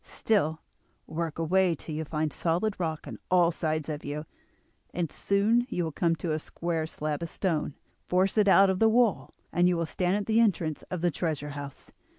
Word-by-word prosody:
Still, 160 -8 0 0.4
work 165 -1 -4
away 175 +2 +2
till 155 - -8
you 155 +1 -2
find 155 0 -2
solid 180 +5 0
rock 160 -3 -2
on - - -7
all 175 -2 +4
sides 155 -2 -2
of 150 -1 -4
you, 150 +2 -4 0.7
and 170 -3 -1
soon 220 +5 +2
you 175 - -1
will 160 - -2
come 165 +2 +1
to 165 0 -3
a 155 - 0
square 165 0 -3
slab 150 -1 -3
of 170 - -4
stone; 155 -6 -1 0.3
force 185 +2 +2
it 210 -2 +4
out 195 0 +6
of 185 - -2
the 225 - +5
wall, 220 - +2 0.2
and 175 0 +4
you 175 - +1
will 165 - 0
stand 180 +3 0
at 205 -1 -1
the 225 +1 +2
entrance 170 -9 +1
of 180 -3 -3
the 175 0 +2
treasure 150 -2 -2
house. 140 -1 -8
170 Hz, 200 wpm, -28 LUFS, 155-190 Hz, 0.7 s, out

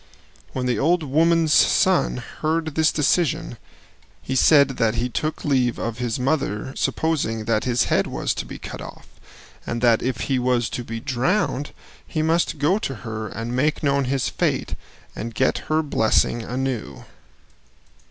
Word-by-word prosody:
When 130 - -2
the 125 -1 0
old 170 +3 +2
woman's 160 +2 +3
son - - +3
heard 160 0 -3
this 160 +1 +3
decision 160 -3 0 0.6
he 130 - -5
said 140 +1 +6
that 115 -1 +1
he 120 +2 -1
took 155 +6 -3
leave 130 -5 +1
of 115 0 -4
his 120 0 -2
mother 130 -4 -1
supposing 135 -9 -1
that 110 -1 0
his 120 -1 +2
head - - +1
was - - -2
to - - -5
be - - -8
cut - - -8
off, - - -10 0.6
and 120 - -3
that 115 -2 +4
if 130 -2 -2
he 135 -2 0
was 125 -2 +1
to 120 - -4
be 115 -1 -5
drowned 140 - 0 0.3
he 155 - -2
must 165 0 +1
go 160 +8 +2
to 135 - -4
her 110 -1 -4
and 115 +4 -5
make 150 +5 0
known 140 -1 +2
his 135 0 0
fate - - -1 0.4
and 115 0 -6
get 130 - +1
her 155 +1 +2
blessing 120 -3 +2
anew. 120 - -4
130 Hz, 160 wpm, -22 LUFS, 115-155 Hz, 0.6 s, said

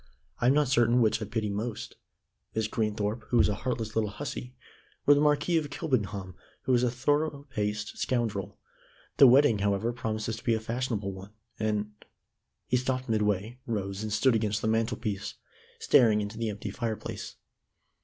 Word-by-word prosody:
I 120 - +2
am 135 - +5
not 150 -1 +3
certain 120 -1 +4
which 110 -1 +2
I - - -2
pity 105 0 -2
most 110 +3 -4 0.6
Miss 110 -1 +1
Greenthorpe, 105 0 -1
who 120 - +2
is - - +5
a 105 - 0
heartless 115 0 -3
little 110 -2 +1
hussy, 125 +4 -6 0.5
or 145 - +8
the 145 - +3
Marquis 150 +3 +3
of 150 -3 -1
Kilbenham 105 - -2 0.3
who 130 - +1
is 120 - +4
a 125 - +2
thorough 145 +4 0
paced 105 -2 -3
scoundrel. 110 -6 -1 0.6
The 140 - +9
wedding, 125 -3 +5
however, 100 +4 0
promises 110 -2 -3
to - - -11
be 115 - +2
a - - -1
fashionable 115 -3 -2
one, 95 +2 -11 0.3
and 105 -1 -1 0.4
" - - -54
He 125 - +4
stopped 130 0 -2
midway, 105 +2 0
rose, 100 -3 -3
and 110 0 -4
stood 110 +5 +3
against 105 -2 0
the - - +1
mantel 110 +1 +1
piece, 105 -2 -4 0.4
staring 110 -4 +4
into 105 +2 -4
the 115 -1 -1
empty 105 -1 -5
fireplace. 115 0 -4
110 Hz, 175 wpm, -29 LUFS, 105-125 Hz, 0.6 s, The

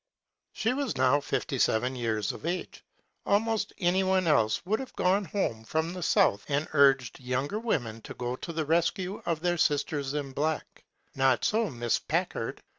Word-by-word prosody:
She 225 +3 0
was 275 -3 -2
now 130 +2 +4
fifty 135 -2 -2
seven 125 +4 +2
years 110 -4 -1
of - - -10
age. 175 +3 -4 0.4
Al» 200 - +5
most 225 -1 -2
anyone 185 +1 +2
else 115 -5 +2
would 215 +4 0
have 265 - -8
gone 195 +2 +2
home 150 - -2
from 160 +7 -1
the 180 - -6
south 100 -10 +3
and 145 +1 0
urged 135 -3 +4
younger 130 +10 -2
women 120 - -2
ta - - -9
go 125 0 -3
to 170 - -6
the 160 -1 -2
rescue 170 +4 0
of 165 -2 0
their 175 -1 0
"sisters 145 -2 0
in 140 -2 -3
black.'* 155 +3 -3 0.3
Not 130 -2 +2
so 220 -1 +1
Miss 120 -2 0
Packard. - - -2
155 Hz, 175 wpm, -28 LUFS, 130-185 Hz, 0.4 s, Al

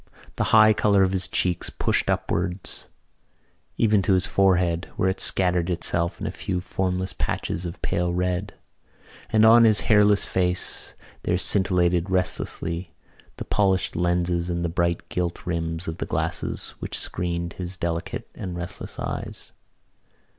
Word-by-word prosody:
The - - 0
high 110 0 +6
colour 100 -2 +3
of 95 - +1
his 95 -1 +3
cheeks 90 -2 0
pushed - - 0
upwards 90 +1 -2 0.9
even 105 -3 +3
to 95 +1 +2
his 95 - +1
forehead 90 -3 +1
where 95 - +1
it 95 - -3
scattered 90 -2 +1
itself 85 -1 -1
in - - -5
a - - -2
few 90 - -3
formless 90 0 -2
patches 80 +3 -3
of 85 - -8
pale 90 0 0
red; 90 +2 -2 0.8
and 110 0 +5
on 115 +1 +8
his 110 -2 +5
hairless 105 -2 +4
face 90 0 -1 0.3
there 90 - 0
scintillated 90 -2 +3
restlessly 85 -2 -2 0.4
the - - -6
polished 95 -2 +1
lenses 85 0 0
and 85 0 -1
the - - -1
bright 85 0 -1
gilt 90 -1 -3
rims 85 0 -3
of 80 0 -5
the - - -3
glasses - - -2
which - - -3
screened 85 -1 -2
his 90 0 -6
delicate 85 -1 -3
and 90 -2 -6
restless 85 0 -6
eyes. - - -6
90 Hz, 145 wpm, -24 LUFS, 85-95 Hz, 0.9 s, on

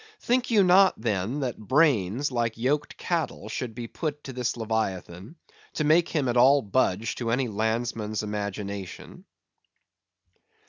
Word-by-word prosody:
Think 250 +1 0
you 215 -4 +5
not 190 +1 +5
then 110 +4 -1
that 125 -3 -3
brains, 130 - +2
like 115 -2 -1
yoked 140 +5 -1
cattle, 165 - -3
should 115 0 -4
be 120 -1 -5
put 150 +2 -5
to 135 - -7
this 125 -1 -2
leviathan, 105 - -3 0.4
to 155 - -1
make 160 +3 +4
him 145 -5 0
at 120 0 0
all 135 +3 +6
budge 105 0 0
to 120 -2 -3
any 125 +2 +1
landsman's 110 0 -2
imagination? 100 -2 -6
120 Hz, 140 wpm, -26 LUFS, 105-145 Hz, 0.4 s, all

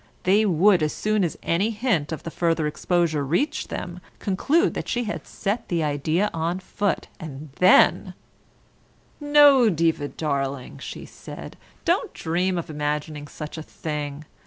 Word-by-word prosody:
They 205 +4 +4
would, 185 +1 +4
as 155 -1 0
soon 215 -1 0
as 170 - -2
any 185 +6 +1
hint 210 - 0
of 160 - -5
the 165 - -6
further 165 -2 0
exposure 160 0 0
reached 260 - -1
them, 175 0 -5 0.2
conclude 295 - +1
that - - -5
she 245 0 0
had 215 - -5
set 210 +3 -3
the 170 -2 0
idea 155 +7 0
on 165 +2 -1
foot, 200 +1 -2
and 150 -3 -8
then 185 +1 +5 1.0
"No, 290 -5 +6
Diva 165 -4 +1
darling," 140 -4 -3
she - - -7
said, - - -10 0.3
"don't - - +1
dream 180 +3 0
of 170 - -3
imagining 150 0 -3
such 150 +2 -7
a - - -5
thing. 150 -2 -5
170 Hz, 150 wpm, -24 LUFS, 150-205 Hz, 1.0 s, No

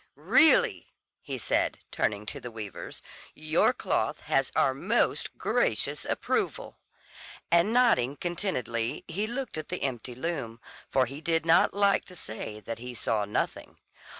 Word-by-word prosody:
"Really," 485 +10 +4 0.3
he 135 -3 -5
said, 110 -3 0
turning 105 0 -1
to - - -5
the 125 - -7
weavers, 110 -4 -8 0.3
"your - - +2
cloth - - -1
has - - +1
our - - +3
most - - 0
gracious - - 0
approval;" - - -2 0.7
and 170 +5 +4
nodding 225 - +3
contentedly 150 - -2
he 200 +6 -2
looked 245 -7 -4
at 155 - -8
the 180 - -3
empty 125 -2 -3
loom, 130 -6 -4 0.3
for 130 -1 +3
he 135 +5 -8
did 165 0 0
not 165 +3 +4
like 200 -1 +3
to 180 - -13
say 110 -6 -6
that 115 +1 -6
he 125 +1 -7
saw 110 -2 0
nothing. 105 - -3
140 Hz, 145 wpm, -28 LUFS, 115-180 Hz, 0.7 s, Really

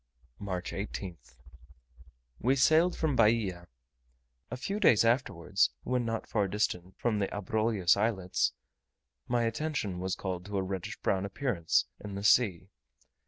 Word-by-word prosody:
March 95 -3 -4
18th. 90 - -6 1.0
We 130 +4 +2
sailed 160 +6 +4
from 155 -4 0
Bahia. 105 -7 +2 0.8
A 125 - -5
few 195 +11 -3
days 115 - +5
afterwards, 100 -6 +2
when 125 -1 0
not 115 -1 -2
far 105 -3 0
distant 95 -2 -2
from 110 -3 0
the 100 - +1
Abrolhos 105 -2 +1
Islets, 100 -3 0 0.7
my 120 -1 +1
attention 115 - -2
was 95 0 -2
called 90 -2 -4
to 100 0 -3
a 95 - 0
reddish 95 -1 -5
brown 95 0 +1
appearance 100 -4 0
in 100 -1 -7
the 100 - -5
sea. 100 -4 +3
105 Hz, 135 wpm, -30 LUFS, 95-120 Hz, 1.0 s, days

